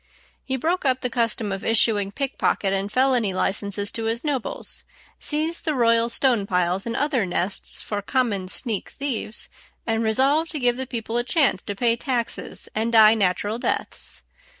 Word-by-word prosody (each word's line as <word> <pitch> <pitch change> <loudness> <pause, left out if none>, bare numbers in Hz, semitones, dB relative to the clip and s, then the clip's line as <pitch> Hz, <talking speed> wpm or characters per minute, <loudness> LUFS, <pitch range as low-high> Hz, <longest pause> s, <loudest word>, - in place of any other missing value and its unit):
He 265 0 -2
broke 335 +7 0
up 260 -2 +1
the 250 - -2
custom 230 -3 0
of 195 0 -4
issuing 215 -3 +3
pickpocket 250 -6 0
and 195 +1 -2
felony 250 -6 +2
licenses 200 +1 0
to 225 - -3
his 230 +2 -1
nobles, 285 -6 -4 0.4
seized 315 +3 -1
the 310 -3 -1
royal 230 -1 +3
stone 235 -5 +2
piles 180 +2 0
and 230 - -3
other 280 -5 +1
nests 185 +1 -1
for 205 -1 -3
common 205 -5 0
sneak 215 +2 -2
thieves, 250 -5 -4 0.4
and 225 -1 0
resolved 270 +9 +2
to 300 - -2
give 245 -2 +2
the 260 +1 -5
people 230 -2 -3
a 240 - +2
chance 250 - +2
to 205 - -5
pay 230 +2 +2
taxes 240 -1 -3
and 225 +2 -1
die 220 -1 +8
natural 205 +2 0
deaths. - - -3
230 Hz, 170 wpm, -23 LUFS, 205-260 Hz, 0.4 s, die